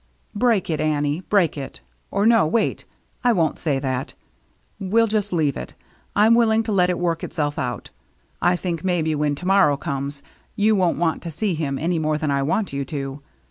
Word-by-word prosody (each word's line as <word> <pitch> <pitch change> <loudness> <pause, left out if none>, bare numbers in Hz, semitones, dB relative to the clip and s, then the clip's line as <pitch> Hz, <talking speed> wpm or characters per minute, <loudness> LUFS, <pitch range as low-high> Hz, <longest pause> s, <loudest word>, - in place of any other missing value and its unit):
" - - -41
Break 225 -6 +3
it, 155 - -1
Annie, 150 +1 0
break 190 -7 +3
it. 140 -2 -7 0.3
Or 200 - 0
no, 225 -7 +5
wait 225 +8 0 0.2
— - - -40
I 245 - +4
won't 165 -6 0
say 150 -4 0
that. 130 -1 -3 0.6
We'll 215 +4 +2
just 210 -2 -1
leave 155 -6 +1
it. 65 - -7 0.4
I'm 215 +2 +5
willing 225 -1 +3
to 220 - -3
let 180 -3 +3
it 180 - 0
work 170 -2 -1
itself 145 -1 -2
out. 125 -1 -4 0.5
I 175 +1 +3
think, 175 -2 -3
maybe, 170 -4 0
when 150 -1 0
to 175 - -9
morrow 190 -7 +4
comes, 140 -2 -4 0.3
you 215 0 +3
won't 185 -3 +1
want 165 -1 0
to 170 - -6
see 180 +5 -1
him 145 -4 -2
any 170 +2 0
more 155 -1 0
than 150 -1 -1
I 140 0 +1
want 170 +6 -1
you 140 0 -2
to. 135 0 -5
165 Hz, 205 wpm, -22 LUFS, 145-200 Hz, 0.6 s, no